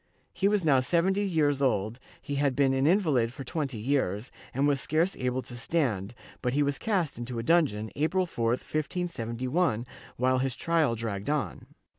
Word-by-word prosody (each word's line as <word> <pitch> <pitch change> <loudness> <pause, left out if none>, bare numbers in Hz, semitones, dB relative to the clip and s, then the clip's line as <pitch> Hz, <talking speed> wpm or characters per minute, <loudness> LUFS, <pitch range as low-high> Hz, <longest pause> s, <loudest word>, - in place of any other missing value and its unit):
He 195 - +1
was 205 -4 +1
now 140 -4 +5
seventy 175 +9 +2
years 155 -8 +1
old, 115 -3 +1 0.2
he 145 +2 -6
had 140 -2 +1
been 135 -2 +3
an 135 +2 +2
invalid 155 - +3
for 135 - -7
twenty 135 -2 -3
years, 110 -2 -1 0.2
and 135 +3 +1
was 140 -2 +1
scarce 165 +5 +1
able 125 0 -1
to 120 - -10
stand, 120 - -1 0.3
but 125 +1 -1
he 145 - +3
was 140 -1 -1
cast 185 - 0
into 120 0 -5
a 115 - -2
dungeon, 120 -9 +2
April 180 +5 +1
4, 115 -9 -2
1571, 130 -1 -1 0.3
while 130 +1 +2
his 130 -2 -1
trial 160 -7 +1
dragged 110 -1 -4
on. 150 -1 -2
135 Hz, 175 wpm, -28 LUFS, 120-160 Hz, 0.3 s, now